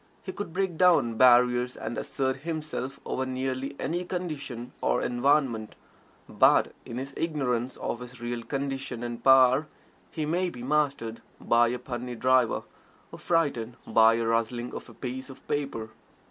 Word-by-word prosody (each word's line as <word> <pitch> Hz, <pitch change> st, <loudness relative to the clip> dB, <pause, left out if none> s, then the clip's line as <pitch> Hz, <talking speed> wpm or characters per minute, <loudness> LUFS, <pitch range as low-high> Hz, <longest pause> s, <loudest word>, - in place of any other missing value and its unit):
He 185 Hz, -, -5 dB
could 200 Hz, -3 st, -6 dB
break 185 Hz, -1 st, -1 dB
down 175 Hz, -10 st, +5 dB
barriers 125 Hz, +1 st, +4 dB
and 115 Hz, -, -4 dB
assert 130 Hz, -1 st, -1 dB
himself 150 Hz, -3 st, -4 dB
over 130 Hz, -, -2 dB
nearly 130 Hz, +1 st, -3 dB
any 175 Hz, +4 st, -2 dB
condition 145 Hz, -9 st, -5 dB
or -, -, +2 dB
environment, 120 Hz, -3 st, +1 dB, 0.5 s
but -, -, +4 dB
in 115 Hz, -, -6 dB
his 135 Hz, +2 st, -5 dB
ignorance 130 Hz, -6 st, -1 dB
of 120 Hz, -, -3 dB
his 125 Hz, 0 st, -10 dB
real 120 Hz, 0 st, -3 dB
condition 135 Hz, -2 st, -4 dB
and 120 Hz, 0 st, -5 dB
power 130 Hz, +2 st, +6 dB, 0.4 s
he 155 Hz, -, -3 dB
may 175 Hz, +4 st, 0 dB
be 120 Hz, -7 st, -9 dB
mastered 140 Hz, -5 st, 0 dB, 0.2 s
by 120 Hz, 0 st, +4 dB
a 125 Hz, +2 st, -1 dB
puny 125 Hz, 0 st, -5 dB
driver, 130 Hz, 0 st, +2 dB, 0.5 s
or -, -, -10 dB
frightened 140 Hz, -9 st, 0 dB
by 110 Hz, 0 st, +5 dB
the 115 Hz, 0 st, -1 dB
rustling 115 Hz, +2 st, -1 dB
of -, -, -7 dB
a -, -, -14 dB
piece 130 Hz, +1 st, -6 dB
of 135 Hz, -, -13 dB
paper. 135 Hz, -7 st, -3 dB
130 Hz, 155 wpm, -27 LUFS, 120-145 Hz, 0.5 s, power